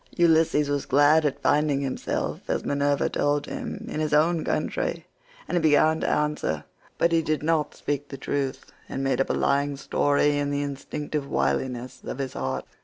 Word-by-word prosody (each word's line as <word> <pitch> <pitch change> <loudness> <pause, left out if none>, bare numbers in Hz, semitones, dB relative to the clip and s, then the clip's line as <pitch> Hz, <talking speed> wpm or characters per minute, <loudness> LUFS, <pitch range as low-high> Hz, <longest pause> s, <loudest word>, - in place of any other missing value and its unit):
Ulysses 160 -3 +4
was 145 -1 -1
glad 145 +3 +5
at 140 0 -5
finding 145 0 +2
himself, 135 -2 -3
as - - -1
Minerva 140 0 +1
told 145 0 0
him, 250 -6 -6
in 195 - -4
his 155 -1 +1
own 160 +2 +3
country, - - -2 0.4
and - - -2
he 175 - +2
began 155 +1 +4
to - - -1
answer, 150 - 0 0.3
but 170 - +2
he 165 -1 +3
did 155 -1 -1
not 160 -1 0
speak 145 0 -3
the 135 - -7
truth, 135 0 -3 0.2
and 135 - -3
made 135 -1 +1
up - - -1
a - - +2
lying 140 0 +1
story 145 +1 +2
in 145 0 -1
the 145 0 -1
instinctive 145 +1 -4
wiliness 130 -2 -1
of - - -5
his 135 -2 -4
heart. 65 - -3
145 Hz, 180 wpm, -25 LUFS, 140-155 Hz, 0.4 s, glad